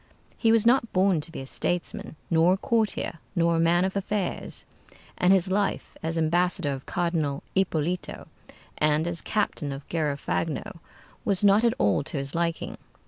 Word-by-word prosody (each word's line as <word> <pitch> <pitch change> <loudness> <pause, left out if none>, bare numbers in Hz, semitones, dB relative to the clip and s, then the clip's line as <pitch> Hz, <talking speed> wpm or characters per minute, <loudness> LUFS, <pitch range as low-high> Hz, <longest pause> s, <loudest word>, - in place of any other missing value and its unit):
He 225 - +2
was 225 -1 +4
not 235 -1 +3
born 185 -3 +3
to 165 - -6
be 165 - -6
a - - -7
statesman, 175 +4 -2 0.2
nor 165 +2 +5
a - - 0
courtier, 215 -6 -1 0.2
nor 170 -1 +3
a - - +1
man 170 +2 +3
of 190 - -3
affairs; 200 -1 -2 0.5
and 180 - +3
his 190 -1 +3
life 200 0 -1
as 165 +1 -2
ambassador 165 -1 +2
of 135 -1 -6
Cardinal 165 -5 -1
Ippolito, 180 -2 -1 0.5
and 150 +1 +3
as 170 -1 -1
captain 185 -8 -1
of 135 +1 -7
Garafagno, 160 +4 -2 0.4
was 200 -3 0
not 205 +2 +5
at 235 -1 +3
all 100 -2 +2
to 155 - -3
his 140 0 -2
liking. 170 -1 -2
170 Hz, 165 wpm, -26 LUFS, 155-195 Hz, 0.5 s, nor